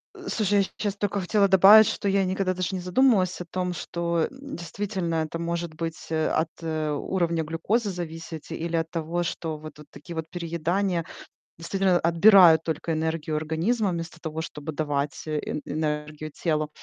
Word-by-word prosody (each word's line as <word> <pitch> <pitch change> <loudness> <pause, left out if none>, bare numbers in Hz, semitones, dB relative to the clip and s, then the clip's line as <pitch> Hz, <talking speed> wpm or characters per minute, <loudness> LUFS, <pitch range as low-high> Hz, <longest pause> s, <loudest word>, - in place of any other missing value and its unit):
Э, - - -8
слушай, 205 -2 +1
я 200 - +4
щ - - -7
щас 205 -2 -2
только 205 0 -1
хотела 200 +2 +3
добавить, 195 +3 +8
что 200 - -1
я 195 0 +2
никогда 185 0 0
даже 185 +1 -2
не 185 - -3
задумывалась 185 -2 +2
о 180 - -5
том, 180 +1 -3
что, 170 0 -3
м, 275 +1 -9
действительно 180 -1 -3
это 160 +1 -2
может 170 -1 -3
быть, 165 0 -6
э, 160 0 +1
от, 165 +1 -8
э, 155 -2 -1
уровня 170 +2 -1
глюкозы 200 +8 -1
зависеть 165 -3 -7
или 165 0 -2
от 165 0 -3
того, 170 +1 -2
что 160 -1 -4
вот 155 0 -11
такие 165 +4 -10
вот 160 0 -4
переедания, 175 +1 -1 0.5
действительно, 185 +1 +1
отбирают 170 -1 +7
только 160 +1 -3
энергию 160 0 -2
организма 170 +8 0
вместо 170 -1 -5
того, 160 -1 -4
чтобы 155 -1 -6
давать 145 -1 -2
э 155 -1 -1
э 150 - -3
энергию 150 0 -3
телу. 155 -3 +1
170 Hz, 175 wpm, -26 LUFS, 160-190 Hz, 0.5 s, добавить